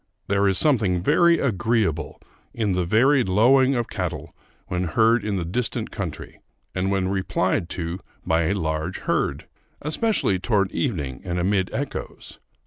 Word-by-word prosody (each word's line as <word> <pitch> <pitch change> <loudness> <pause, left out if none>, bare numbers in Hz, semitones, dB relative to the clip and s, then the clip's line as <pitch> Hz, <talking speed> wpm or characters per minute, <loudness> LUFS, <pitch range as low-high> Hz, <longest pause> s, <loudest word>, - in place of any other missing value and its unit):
There 100 0 +2
is 95 -2 +2
something 105 - +2
very 170 - +4
agreeable 110 - 0 0.4
in 110 -4 0
the 90 -1 0
varied 125 +4 +3
lowing 130 +7 +4
of 120 -2 -1
cattle 85 -6 -5 0.3
when 90 0 -2
heard 115 +7 +3
in 105 -1 -1
the 90 -3 -2
distant 115 +8 -2
country, - - -6 0.3
and 95 +1 -1
when 95 -1 0
replied 95 -2 0
to 85 +1 -3 0.3
by 80 0 +2
a 95 +5 +1
large 80 0 -2
herd, - - -1 0.3
especially 155 - 0
toward 100 0 +1
evening 75 - -2
and 90 -1 -3
amid 95 +1 +1
echoes. 140 0 -6
95 Hz, 145 wpm, -23 LUFS, 90-115 Hz, 0.4 s, very